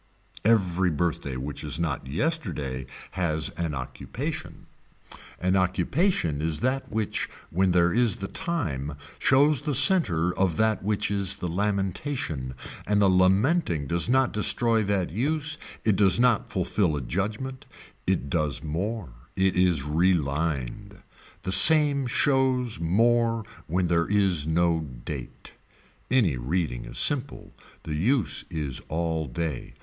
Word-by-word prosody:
Every 95 -5 +2
birthday 75 -5 -2
which 70 +4 -6
is 75 +1 -2
not 75 -6 -3
yesterday 70 - -3 0.2
has 80 -4 -1
an 85 -4 -4
occupation. 65 -1 -6 0.7
An 90 +1 0
occupation 95 - 0
is 80 -1 -1
that 130 +2 -2
which 110 -1 -2 0.2
when 95 +3 +1
there 85 -1 +2
is 120 -3 +2
the 95 - -6
time 75 - -4 0.2
shows 140 +1 +3
the 150 -3 -1
center 90 - +4
of 95 -4 0
that 110 -1 +1
which 105 0 -1
is 100 -1 +2
the 90 - -5
lamentation 95 - -3 0.3
and 105 0 +2
lamenting 95 - +2
does 85 - +2
not 130 +1 +2
destroy 115 +2 +2
that 95 -3 -1
use, 150 - -1 0.2
it 105 -4 +2
does 100 0 +4
not 120 -3 +2
fulfill 90 -2 0
a 70 - -3
judgement, 105 - -4 0.4
it 70 - 0
does 75 -3 -2
more, 90 - -4 0.3
it 95 0 +1
is 90 -6 +2
relined. 80 - -1 0.4
The 95 - -3
same 140 - +8
shows 130 - +1
more 115 +6 +1 0.2
when 90 +3 0
there 85 -1 +1
is 95 -7 +2
no 85 0 +1
date. 65 -2 -9 0.6
Any 105 - +2
reading 65 0 -3
is - - -7
simple. 140 -1 0 0.3
The 80 - -5
use 100 - +1
is 75 -5 -4
all 80 -1 -2
day. 75 +1 -5
95 Hz, 130 wpm, -25 LUFS, 80-115 Hz, 0.7 s, same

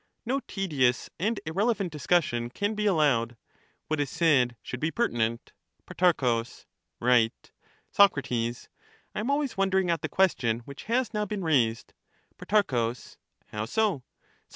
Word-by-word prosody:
No 265 +4 0
tedious 140 -11 0
and 215 +4 0
irrelevant 195 +3 0
discussion 145 -6 0
can 205 - -2
be 210 0 -1
allowed; 135 - +2 0.5
what 155 -1 -1
is 145 -2 0
said 130 -8 +2
should 130 - -6
be 155 - 0
pertinent. 115 - -1 0.3
Pro. 130 -10 +2 0.6
Right. 120 -2 +2 0.4
Soc. 200 -1 +6 0.2
I 115 0 0 0.7
am 220 +5 -2
always 280 -4 0
wondering 190 -2 +2
at 165 - -1
the - - -3
question 120 -12 +1
which 140 +4 -11
has 240 +2 0
now 210 0 0
been 205 -1 -4
raised. 120 -8 +1 0.5
Pro, 210 0 +3 0.9
How 105 0 -3
so? 200 - 0
160 Hz, 130 wpm, -27 LUFS, 120-205 Hz, 0.9 s, Soc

